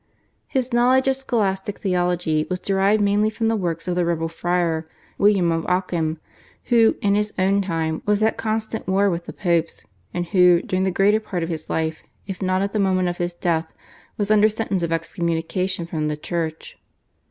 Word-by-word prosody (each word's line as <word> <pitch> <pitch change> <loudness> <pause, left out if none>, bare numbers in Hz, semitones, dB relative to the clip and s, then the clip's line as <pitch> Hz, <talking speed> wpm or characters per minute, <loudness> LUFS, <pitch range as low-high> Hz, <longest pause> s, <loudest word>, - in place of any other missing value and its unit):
His 260 -2 -2
knowledge 255 +2 +4
of 265 - +3
Scholastic 205 -7 -1
Theology 175 -4 0
was 185 0 -2
derived 195 +3 +2
mainly 205 +1 +2
from 225 +1 -1
the 225 - +1
works 170 -5 -3
of 180 - 0
the 180 - +1
rebel 165 -1 -1
friar 165 -1 -1 0.3
William 195 -4 +4
of 165 0 -1
Occam, 170 -3 -1 0.5
who, 230 -2 +5
in 200 -1 +3
his 210 +1 0
own 195 +2 +2
time, 165 -4 -2
was 210 +1 +2
at 220 - +2
constant 220 0 -3
war 195 +1 +2
with 170 0 -4
the - - -5
Popes, 170 -3 -1 0.3
and 175 0 -2
who, 180 0 +5
during 185 0 -1
the - - +2
greater 200 +4 +3
part 185 -5 -4
of 165 - -3
his 160 -2 -5
life, 160 0 -2 0.2
if 190 -1 -6
not 185 0 +1
at 200 - -3
the 215 - 0
moment 185 -2 +2
of 175 - -4
his 175 0 -3
death, 165 -2 -1 0.4
was 205 0 0
under 215 0 +5
sentence 210 -4 -2
of 170 -1 -2
excommunication 170 +2 -1
from 155 -2 -2
the 150 0 -2
Church. 160 0 -4
185 Hz, 190 wpm, -22 LUFS, 170-205 Hz, 0.5 s, who